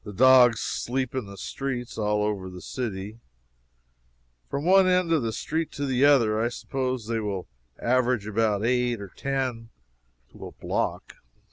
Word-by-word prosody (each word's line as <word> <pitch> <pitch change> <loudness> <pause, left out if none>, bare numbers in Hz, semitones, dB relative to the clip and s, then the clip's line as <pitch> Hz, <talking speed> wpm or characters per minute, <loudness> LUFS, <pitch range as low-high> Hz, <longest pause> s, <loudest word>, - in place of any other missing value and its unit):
The 105 - -8
dogs 125 0 +6
sleep 130 0 -2
in 130 -6 -3
the 100 0 -10
streets, 125 -1 -4
all 105 -1 0
over 100 -3 -2
the 90 0 -9
city. 105 -1 -5 1.3
From 140 +2 -3
one 190 +1 +6
end 180 -2 +2
of 160 - +3
the 115 -1 -1
street 160 +8 -3
to 145 - -3
the 130 0 +2
other, 115 -7 +4
I 120 - +1
suppose 130 -1 -3
they 115 0 -1
will 100 -4 -4 0.3
average 125 -3 +1
about 105 0 0
eight 125 -1 +1
or 100 -1 -8
ten 130 -2 -3 0.6
to - - -12
a - - -12
block. - - -3
120 Hz, 160 wpm, -26 LUFS, 105-130 Hz, 1.3 s, dogs